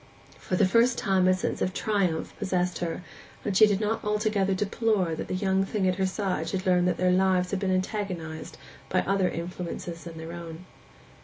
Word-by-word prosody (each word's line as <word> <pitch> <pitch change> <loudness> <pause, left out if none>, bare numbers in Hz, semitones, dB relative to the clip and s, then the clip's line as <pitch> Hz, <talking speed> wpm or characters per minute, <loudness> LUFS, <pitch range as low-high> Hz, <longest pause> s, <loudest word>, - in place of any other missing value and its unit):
For 185 - -2
the 195 - +4
first 230 +6 +3
time 190 -2 +2
a 185 - +6
sense 185 - -3
of 185 - 0
triumph 190 -7 0
possessed 180 -3 0
her, 175 +1 -3 0.4
and 200 - -1
she 215 +2 +8
did 200 -2 +1
not 220 +1 -1
altogether 210 -2 +1
deplore 200 -3 0
that 160 - -4
the - - -2
young 190 0 +1
thing 195 -1 0
at 185 0 +1
her 190 -1 +1
side 190 0 -2
should 190 0 -3
learn 180 -1 +3
that 180 - +1
their 180 0 +3
lives 185 -1 +2
had 195 - 0
been 195 -1 -1
antagonized 185 -5 -3 0.3
by - - +2
other 195 -1 +1
influences 170 0 -5
than 165 -1 -8
their 160 +1 -7
own. 170 0 -8
185 Hz, 200 wpm, -27 LUFS, 180-200 Hz, 0.4 s, she